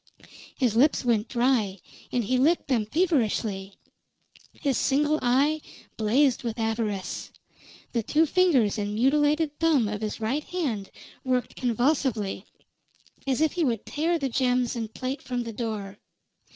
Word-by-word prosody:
His 245 -5 +1
lips 270 +2 +3
went 225 -2 +2
dry, 235 -6 +1 0.3
and 245 - 0
he 255 +4 +1
licked 310 +3 +2
them 230 -5 +1
feverishly; 220 - 0 0.8
his 275 -3 -1
single 295 +5 +2
eye 280 +5 +2 0.3
blazed 245 +5 +2
with 230 -1 -3
avarice; 220 -4 -2 0.6
the 235 - 0
two 305 +8 +2
fingers 280 - +3
and 205 0 -2
mutilated 295 +5 +2
thumb 310 -9 +3
of 210 0 -4
his 215 -1 -3
right 250 +7 -1
hand 255 - -3 0.3
worked 255 -1 -1
convulsively, 240 -5 0 0.8
as 270 +2 +1
if 315 -2 +3
he 350 - -1
would 235 -7 -1
tear 330 +3 0
the 280 -4 -1
gems 250 -1 +1
and 225 -2 -4
plate 265 +2 -3
from 245 -1 -3
the 230 -1 -6
door. 210 -3 -5
250 Hz, 140 wpm, -26 LUFS, 220-290 Hz, 0.8 s, lips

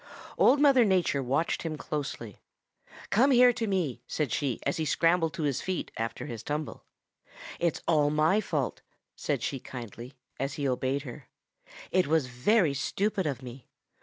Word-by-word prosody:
Old 275 +3 +5
Mother 275 -4 +6
Nature 185 -8 +2
watched 135 +6 0
him 160 -2 -4
closely. 140 -9 -5 0.7
'Come 250 +7 +4
here 250 -2 +6
to 230 -1 -2
me,' 170 - -1
said 150 -6 -2
she 130 -2 -1
as 140 - 0
he 160 - -1
scrambled 165 +2 +2
to 165 - -3
his 140 -4 0
feet 185 -1 -3
after 115 0 -4
his 115 -3 -6
tumble. 150 +5 -4 0.8
'It's 170 -2 0
all 150 -3 +3
my 155 +7 +3
fault,' 150 - -2 0.3
said - - -2
she 135 - -2
kindly, 120 +1 -9 0.2
as 135 +1 -2
he 140 -2 -1
obeyed 130 +2 -1
her. 125 -4 -10 0.6
'It 185 -3 +2
was 155 -2 +2
very 145 - +2
stupid 190 +6 -1
of 135 -3 -4
me. 125 +1 -10
150 Hz, 165 wpm, -28 LUFS, 130-185 Hz, 0.8 s, Mother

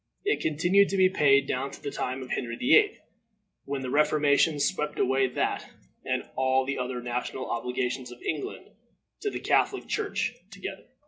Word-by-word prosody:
It 415 - +2
continued 175 +6 +3
to 195 - -1
be 185 -1 +6
paid 140 -6 +4
down 135 +2 -1
to - - -11
the 140 - -5
time 130 0 -3
of 125 - -10
Henry 115 -2 -2
VIII., 415 - +4 0.7
when 140 -1 -3
the 125 - -4
reformation 150 0 +3
swept 150 -2 0
away 130 +1 +2
that, 125 - -2 0.3
and - - -2
all 130 0 +2
the 135 0 -2
other 125 -1 -3
national 125 +2 -3
obligations 125 +1 -2
of 120 - -11
England 390 - -4 0.5
to 420 - -1
the - - -5
Catholic - - +1
Church - - -1 0.2
together. - - -8
135 Hz, 170 wpm, -27 LUFS, 130-155 Hz, 0.7 s, be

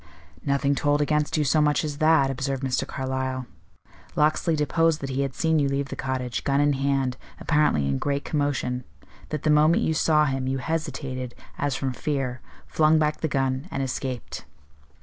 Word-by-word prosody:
"Nothing 140 0 +1
told 145 +1 +1
against 150 +1 +1
you 150 - +2
so 150 +2 +3
much 150 +1 +2
as 150 -1 -4
that," 155 -4 +4
observed 135 0 -3
Mr. 130 -1 0
Carlyle. 130 -1 -3 0.7
"Locksley 155 +2 +2
deposed 160 +1 +2
that 135 -1 -4
he 135 +1 -1
had 135 -2 -2
seen 160 -1 +2
you 140 -1 +2
leave 140 0 -1
the - - -5
cottage, 130 -2 -3
gun 140 0 +1
in 145 0 +3
hand, 135 -2 0 0.2
apparently 150 - +2
in 70 -1 0
great 140 0 -1
commotion; 140 -4 -1 0.5
that 155 -2 -4
the 155 - +3
moment 155 +2 +4
you 160 - +1
saw 155 -1 +3
him, 135 -2 -1
you 135 +1 0
hesitated, 130 -5 -3 0.2
as 145 -2 0
from 135 -2 -2
fear, 130 -3 -2 0.2
flung 155 0 +3
back 150 -1 0
the 160 - +1
gun, 135 +1 -1
and 135 - -2
escaped." 130 -1 -4
140 Hz, 180 wpm, -25 LUFS, 130-150 Hz, 0.7 s, that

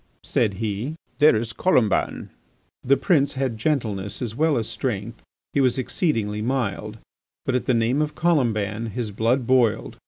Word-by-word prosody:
said 105 -4 0
he, 110 +7 -3 0.2
"there 150 -2 +6
is 115 +1 -2
Colomban!" 125 - +1 0.5
The 140 +2 +4
prince 145 -7 +2
had 130 -3 -1
gentleness 105 -8 -1
as 120 -4 -3
well 155 +1 +2
as 110 -2 -1
strength; 115 0 -4 0.3
he 140 - +2
was 130 -1 +2
exceedingly 115 - -1
mild; 110 -3 -2 0.5
but 130 - 0
at 125 - -1
the 125 - +3
name 115 +5 +2
of 150 0 -2
Colomban 115 -9 +1
his 110 0 -4
blood 115 +5 +1
boiled. 125 -3 +1
120 Hz, 155 wpm, -23 LUFS, 105-135 Hz, 0.5 s, there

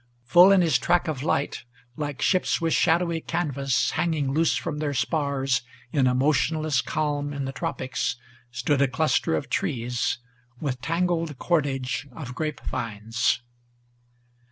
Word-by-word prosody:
Full 175 +11 +7
in 195 -2 +6
his 165 -2 +3
track 175 0 +2
of 150 -5 -2
light, 140 -1 -1 0.3
like 145 -3 -4
ships 185 -2 +2
with 165 -2 0
shadowy 170 0 +2
canvas 140 -6 0
Hanging 155 -5 0
loose 165 +2 +2
from 155 -3 -3
their 145 -2 -2
spars 135 -4 0 0.3
in 140 -5 +3
a 125 - +2
motionless 150 +1 +2
calm 145 -1 -2
in 140 -1 -3
the 135 - -3
tropics, 130 -1 -2 0.3
Stood 125 +4 0
a 140 - +5
cluster 130 - +1
of 80 - -3
trees, 120 -1 -1 0.4
with 130 -4 -3
tangled 165 -2 -1
cordage 135 -4 -1
of 125 -2 -7
grape 155 +2 -3
vines. 115 +2 -1
145 Hz, 140 wpm, -25 LUFS, 130-160 Hz, 0.4 s, Full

